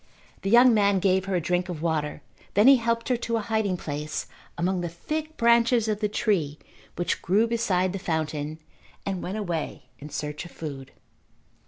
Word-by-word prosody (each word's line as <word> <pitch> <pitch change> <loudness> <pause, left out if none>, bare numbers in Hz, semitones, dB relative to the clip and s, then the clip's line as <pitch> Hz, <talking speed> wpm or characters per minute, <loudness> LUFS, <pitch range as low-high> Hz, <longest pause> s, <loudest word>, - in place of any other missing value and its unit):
The 195 - -2
young 240 +2 +7
man 200 -2 +3
gave 190 0 +2
her 195 -1 -1
a - - +3
drink 180 +2 -1
of 165 -3 -5
water. 155 -3 -1 0.3
Then 205 +2 +5
he 275 0 +9
helped 230 -1 -1
her 250 - +2
to 230 -1 -1
a - - -1
hiding 215 -4 0
place 150 -1 -4 0.3
among 180 +1 0
the 175 - -3
thick 310 - -5
branches 235 0 +4
of 210 -1 0
the 210 -1 0
tree 185 -10 0 0.4
which 175 - -1
grew 205 +6 +3
beside 190 -6 +1
the 195 - -3
fountain 155 -3 -2 0.5
and 190 -3 -2
went 190 +4 -4
away 175 -7 -4
in 150 - -9
search 150 +1 -4
of 175 - -10
food. 140 -6 -7
190 Hz, 185 wpm, -26 LUFS, 160-225 Hz, 0.5 s, he